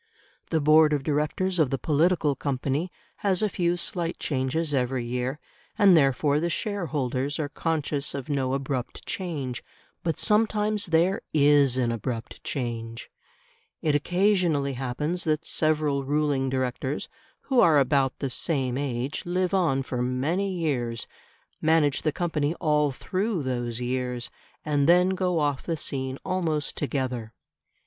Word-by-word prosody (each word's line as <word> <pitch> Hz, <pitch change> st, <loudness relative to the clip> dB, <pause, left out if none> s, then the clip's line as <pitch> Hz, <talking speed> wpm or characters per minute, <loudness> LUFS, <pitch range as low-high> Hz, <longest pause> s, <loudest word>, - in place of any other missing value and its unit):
The 160 Hz, -, +1 dB
board 155 Hz, +1 st, +5 dB
of 145 Hz, -2 st, 0 dB
directors 155 Hz, +5 st, 0 dB
of 150 Hz, -5 st, +3 dB
the 135 Hz, -, -1 dB
political 155 Hz, 0 st, +2 dB
company 140 Hz, +5 st, -2 dB, 0.3 s
has 195 Hz, -1 st, +1 dB
a 210 Hz, -, +2 dB
few 175 Hz, -1 st, 0 dB
slight 175 Hz, -1 st, -2 dB
changes 145 Hz, +3 st, -1 dB
every 125 Hz, -2 st, 0 dB
year, 125 Hz, +4 st, -2 dB, 0.4 s
and 200 Hz, -4 st, +7 dB
therefore 140 Hz, 0 st, +3 dB
the 170 Hz, +2 st, 0 dB
shareholders 145 Hz, -, -2 dB
are 150 Hz, -2 st, -2 dB
conscious 150 Hz, -3 st, -2 dB
of 135 Hz, -2 st, -5 dB
no 135 Hz, -3 st, 0 dB
abrupt 135 Hz, -2 st, -4 dB
change. 145 Hz, -10 st, -4 dB, 0.4 s
But 165 Hz, -3 st, -1 dB
sometimes 210 Hz, -1 st, +1 dB
there 170 Hz, +4 st, +2 dB
IS 145 Hz, -3 st, +5 dB
an 120 Hz, -2 st, +1 dB
abrupt 115 Hz, +1 st, -5 dB
change. 115 Hz, -3 st, -4 dB, 0.7 s
It 155 Hz, -, +2 dB
occasionally 175 Hz, -3 st, +2 dB
happens 135 Hz, +7 st, -2 dB
that 155 Hz, 0 st, 0 dB
several 150 Hz, -3 st, +1 dB
ruling 145 Hz, -1 st, 0 dB
directors 130 Hz, +1 st, -2 dB, 0.3 s
who 265 Hz, -3 st, +1 dB
are 160 Hz, -8 st, +6 dB
about 135 Hz, -1 st, +2 dB
the 135 Hz, -2 st, -3 dB
same 130 Hz, -3 st, 0 dB
age 135 Hz, 0 st, -3 dB
live 180 Hz, +1 st, 0 dB
on 160 Hz, -8 st, +2 dB
for 125 Hz, -2 st, -3 dB
many 145 Hz, +11 st, 0 dB
years, 130 Hz, -10 st, -2 dB, 0.6 s
manage 155 Hz, -3 st, +3 dB
the 155 Hz, -, +1 dB
company 155 Hz, -1 st, -1 dB
all 150 Hz, -3 st, +2 dB
through 185 Hz, -, -2 dB
those 120 Hz, -2 st, -2 dB
years, 125 Hz, 0 st, -3 dB, 0.3 s
and 145 Hz, 0 st, +2 dB
then 180 Hz, +1 st, +6 dB
go 185 Hz, -2 st, 0 dB
off 145 Hz, -3 st, 0 dB
the 165 Hz, -2 st, -3 dB
scene 130 Hz, -2 st, -3 dB
almost 165 Hz, -6 st, -1 dB
together. 125 Hz, -6 st, -3 dB
145 Hz, 140 wpm, -26 LUFS, 130-170 Hz, 0.7 s, and